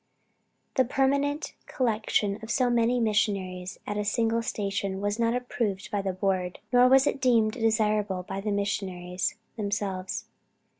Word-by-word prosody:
The 260 - +6
permanent 280 +3 0
collection 215 -4 0
of 220 - -9
so 250 0 +2
many 240 +1 +2
Missionaries 200 -4 0
at 205 - -3
a - - 0
single 225 +2 +1
station 200 -3 -2
was 205 +2 -1
not 230 0 +2
approved 225 -6 -2
by 205 -2 0
the 195 -1 -1
Board, 185 -1 -1 0.2
nor 245 0 +7
was 265 +1 +6
it 275 - -1
deemed 230 -4 +4
desirable 215 -5 +1
by 195 +2 -5
the 210 - -2
Missionaries 190 -3 -2 0.2
themselves. 200 -3 -2
210 Hz, 145 wpm, -27 LUFS, 195-235 Hz, 0.2 s, nor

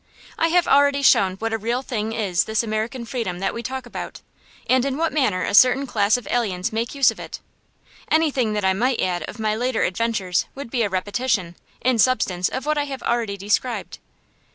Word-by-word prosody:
I 330 - +2
have 350 +1 +2
already 280 0 +4
shown 190 -7 +4
what 225 +3 -3
a 225 - -1
real 235 +4 -2
thing 220 -4 -3
is 200 -6 0
this 220 +1 0
American 225 +3 -3
freedom 230 -8 -3
that 195 +1 -2
we 235 - -5
talk 260 +2 -5
about, 240 - -7 0.5
and 255 -1 +3
in 275 0 -2
what 330 0 0
manner 215 -12 +1
a - - -2
certain 255 +5 +6
class 205 -3 +2
of 245 - -9
aliens 215 -3 -1
make 230 +4 -2
use 270 -4 +5
of 225 - -12
it. - - -7 0.7
Anything 280 -8 +2
that 210 -2 -1
I 190 - +3
might 245 +5 0
add 175 -1 0
of - - -9
my 215 -1 0
later 245 +1 0
adventures 190 -2 0
would 270 -4 -8
be 245 - 0
a 210 - +1
repetition, 200 -1 -1 0.3
in 250 -2 +1
substance, 195 -7 +2
of 260 +1 -5
what 305 0 +1
I 290 - 0
have 270 -2 -7
already 230 -4 -1
described. 210 +5 -2
230 Hz, 205 wpm, -22 LUFS, 205-260 Hz, 0.7 s, certain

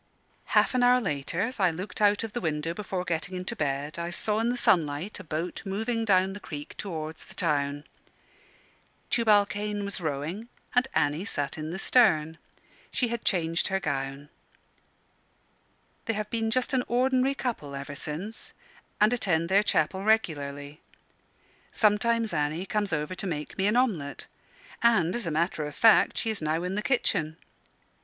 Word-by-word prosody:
Half - - +4
an 255 - +2
hour 250 0 +6
later 150 - -2
as 230 +3 -2
I 185 -2 +4
looked 185 +6 -6
out 205 +1 +4
of 225 -2 -5
the 240 - -3
window 160 -1 -1
before 185 -1 -3
getting 175 +2 -2
into 180 0 -4
bed 145 +2 -2
I 170 0 -2
saw 210 +4 -1
in 230 +1 +1
the 245 - -1
sunlight 165 -1 +1
a - - -8
boat 165 +2 -4
moving 225 +3 -1
down 190 -2 +3
the 205 - -7
creek 145 -6 -8
towards 160 -5 -5
the 190 - -14
town. 145 -4 0 1.3
Tubal 215 -3 +5
Cain 205 0 -3
was 200 -2 -3
rowing, 160 +9 -3 0.2
and 250 +1 +3
Annie 150 +5 +1
sat 145 -9 -2
in 155 0 -5
the 175 - -4
stern. 160 -9 +3 0.5
She 245 - 0
had 235 -1 -3
changed 165 -3 +1
her 190 0 0
gown. 140 -2 -3 1.8
They 225 - 0
have 210 0 -4
been 225 -1 0
just 255 +3 0
an 255 -1 +2
ordinary 255 +2 +2
couple 215 - -4
ever 140 +1 -6
since, 160 +10 -4 0.5
and 215 +3 +5
attend 170 -8 +1
their 195 +2 +5
chapel 190 -1 +1
regularly. 145 -9 0 0.9
Sometimes 225 0 +2
Annie 155 +3 -1
comes 205 -1 -1
over 150 +2 -1
to 190 +2 -4
make 150 -4 -4
me 195 +1 +1
an 210 - +2
omelet; 180 - 0 0.6
and, 205 -8 +3
as 240 -6 -2
a - - +1
matter 160 0 0
of 150 - -9
fact, 225 -1 +5
she 225 - 0
is 215 - -4
now 155 +2 0
in 180 +1 -2
the 210 - -1
kitchen. 165 - 0
185 Hz, 170 wpm, -28 LUFS, 155-220 Hz, 1.8 s, hour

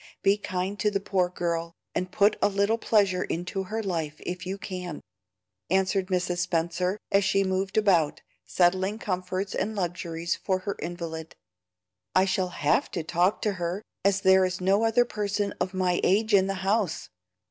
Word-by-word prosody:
Be 195 +1 +5
kind 190 0 -3
to 210 - +2
the 200 -1 -1
poor 190 -2 0
girl, 170 -1 -3 0.2
and 185 0 -2
put 205 +2 +4
a - - +4
little 200 +3 +1
pleasure 195 -5 +2
into 180 +3 -3
her 220 +4 -3
life 165 -6 -2
if 180 0 -4
you 195 +1 -3
can," 180 -4 -6 0.7
answered 190 +1 +1
Mrs. 180 -1 -1
Spenser, 180 +2 0
as 200 0 +4
she 195 +1 +2
moved 190 +1 -1
about, 180 -8 +3 0.2
settling 185 +3 +2
comforts 185 -1 -3
and 215 +3 -2
luxuries 170 -2 -2
for 190 - -1
her 200 - -2
invalid. 165 -2 -6 0.8
"I 185 +1 +5
shall 190 -1 0
HAVE 150 -4 +1
to 170 - -2
talk 175 +5 +1
to 210 - +2
her, 175 +5 -2 0.2
as 200 0 +2
there 190 0 +6
is 185 0 -1
no 195 +4 +3
other 225 +2 +4
person 205 -2 -2
of 185 - 0
my 180 -1 +1
age 215 +3 +2
in 190 -1 +5
the 195 - -1
house. 200 -4 0
185 Hz, 170 wpm, -27 LUFS, 175-200 Hz, 0.8 s, there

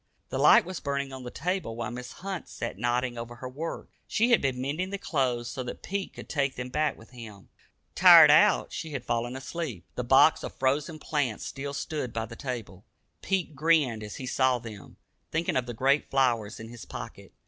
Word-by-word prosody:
The - - -3
light - - +7
was 185 -1 -5
burning 140 -1 -3
on 130 - -7
the 125 - -6
table, 175 -5 -3
while 115 -1 -4
Mrs. 125 +1 -7
Hunt 190 -1 -6
sat 115 -4 -5
nodding 120 0 0
over 120 +1 -7
her 130 - -7
work. 150 +6 -6 0.2
She 235 +3 +2
had 235 - +5
been 130 -2 -1
mending 150 +8 -2
the 200 - -3
clothes 130 -10 -1
so 130 - -4
that 125 - -7
Pete 195 0 -3
could - - -11
take 140 -3 -1
them 125 0 -5
back 150 +4 0
with 110 - -16
him. 110 -6 -11 0.4
Tired - - +9
out, - - +4
she 160 -2 -5
had 130 -3 -4
fallen 120 +2 -1
asleep. 135 - -5
The 125 - -3
box 135 +5 +5
of - - -7
frozen 145 +5 0
plants 145 -7 -2
still 140 +1 -5
stood 145 -5 -4
by 115 0 -2
the 115 - -10
table. 115 -7 -6 0.4
Pete 190 -5 -1
grinned 145 -7 +2
as 105 -1 -7
he 130 - -6
saw 130 0 +2
them, 110 -5 -11 0.3
thinking 165 +1 -1
of 125 -1 0
the 120 - -5
great 135 +5 +2
flowers 120 -6 +1
in 110 0 -8
his 120 0 -10
pocket. - - -9
130 Hz, 205 wpm, -28 LUFS, 120-150 Hz, 0.4 s, Tired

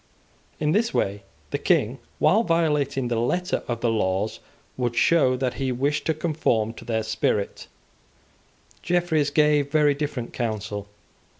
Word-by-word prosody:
In 150 0 +1
this 225 +6 +1
way 100 +1 0 0.3
the - - -1
King, - - +1 0.2
while 215 - +4
violating 150 - +1
the 120 -1 0
letter 180 +10 0
of 120 -1 -3
the 120 - +2
laws, 100 -1 -1 0.4
would 120 -2 -2
show 130 -2 +4
that 125 -1 -1
he 135 -2 -2
wished 140 +4 -1
to 160 - +1
conform 145 -9 0
to - - -12
their 110 -2 -1
spirit, 110 -2 -1 1.1
Jeffreys 175 -4 +1
gave 150 -1 +3
very 150 -1 +4
different 140 -4 -4
counsel. 105 -3 -3
135 Hz, 140 wpm, -24 LUFS, 115-155 Hz, 1.1 s, while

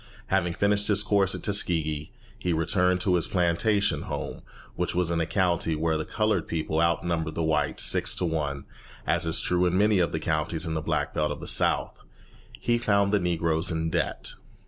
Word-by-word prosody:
Having 90 -3 +1
finished 100 0 +1
his 105 -1 +3
course 100 -2 +2
at - - -7
Tuskegee, 80 -7 0 0.3
he 90 -4 -1
returned 90 +3 +2
to 95 - +2
his 85 -2 +1
plantation 100 +3 +1
home, - - -5 0.3
which 90 0 -2
was 90 -1 0
in 85 -1 0
a 80 - -1
county 85 -3 +1
where 80 +1 0
the 80 - -2
coloured 105 -6 0
people 80 0 -1
outnumbered 85 -1 0
the 85 - -1
whites 75 -2 0
six - - +3
to 90 - -1
one, 75 -4 -2 0.4
as - - 0
is 80 - +3
true 90 0 +1
of 90 - -1
many 105 +1 +3
of 85 - +1
the 80 - -2
counties 80 +1 -1
in 80 - -3
the 80 - -2
Black - - -1
Belt 75 0 0
of - - -5
the - - -8
South. - - +1 0.6
He 120 - +1
found 100 -3 +2
the 105 - +4
Negroes 85 -2 0
in 80 -1 -2
debt. - - -2
85 Hz, 195 wpm, -26 LUFS, 80-95 Hz, 0.6 s, the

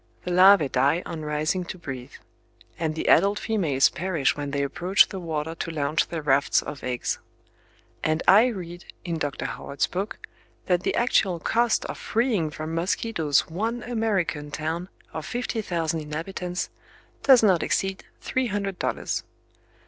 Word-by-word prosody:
The 180 - -3
larvae 185 -3 +7
die 140 +7 +2
on 160 - -5
rising 155 +4 0
to 185 - -7
breathe; 130 -5 -7 0.7
and 160 -2 -1
the 160 - -3
adult 200 +4 +5
females 165 -14 +2
perish 175 -5 0
when 145 -1 -4
they 140 0 -1
approach 175 +8 +3
the 190 - -5
water 160 -2 -3
to 165 - -5
launch 155 0 0
their 165 -3 -5
rafts 140 -1 +3
of 150 -2 -7
eggs. 125 -1 -2 0.8
And 155 +1 +1
I 210 +6 +7
read, 175 -6 -6 0.2
in 170 -2 -2
Dr. 145 -2 -3
Howard's 140 - -2
book, 195 +4 -4 0.5
that 180 -2 +2
the - - -1
actual 195 -7 +2
cost 235 +5 +1
of - - -6
freeing 220 -9 0
from 155 +1 -6
mosquitoes 170 -3 +1
one 225 +8 -3
American 200 -11 -1
town 160 +5 -3 0.2
of 160 - -4
fifty 240 -2 -2
thousand 165 -4 -1
inhabitants, 175 +4 -4 0.5
does 260 -4 +6
not 185 -6 +4
exceed 195 0 -1 0.2
three 260 -1 -1
hundred 200 -3 -3
dollars!... - - -2
170 Hz, 155 wpm, -25 LUFS, 155-195 Hz, 0.8 s, larvae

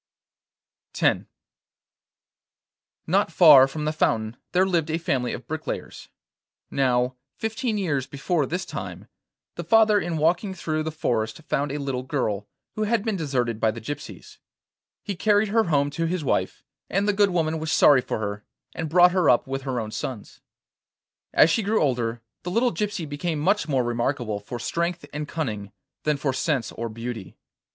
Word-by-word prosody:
X - - +2 1.8
Not - - +2
far 145 -7 +8
from 150 +2 -5
the 155 - 0
fountain 110 -6 0 0.2
there 185 +1 +3
lived 170 -4 0
a 160 - 0
family 130 -7 -1
of 125 - -6
bricklayers. 155 0 -6 0.6
Now, 125 -1 +1 0.2
fifteen 225 0 -2
years 145 -9 -1
before 145 +1 -1
this 180 +3 -3
time, - - -7 0.5
the - - -3
father 220 -2 +5
in 170 -4 -2
walking 175 +5 +1
through 155 -3 -2
the 160 0 -3
forest 115 -3 -2
found 145 -1 -1
a 145 - -2
little 135 -3 -2
girl, 110 -7 -2 0.3
who 215 - -1
had 225 0 0
been 220 -3 0
deserted 125 - -1
by 110 - +3
the 110 +1 -4
gypsies. 145 +6 -8 0.6
He 200 - -4
carried 205 +3 +2
her 225 +2 +3
home 145 -4 +1
to 165 +3 -1
his 175 -1 -2
wife, 135 - -1 0.3
and 200 +2 +1
the 205 - +3
good 200 0 +4
woman 160 -3 0
was 160 0 -3
sorry 140 -5 +6
for - - -3
her, 105 -1 -4 0.3
and 160 -2 -4
brought 180 +2 +6
her 180 -4 +3
up 120 - +4
with 135 0 -4
her 130 -2 -2
own 110 -1 -4
sons. 110 0 -6 0.9
As 160 - +5
she 225 - +2
grew 215 +2 +1
older, 120 -5 0 0.2
the 175 - -5
little 235 +6 +2
gypsy 205 -7 -3
became 150 +3 -3
much 195 +7 +1
more 135 -4 +1
remarkable 120 -2 -1
for 110 +4 -7
strength 170 +6 -2
and 150 0 -4
cunning 105 -12 -4 0.3
than 150 -1 +2
for 140 -1 -1
sense 135 -5 -1
or 115 0 -5
beauty. 115 -2 -7
150 Hz, 170 wpm, -25 LUFS, 125-180 Hz, 1.8 s, far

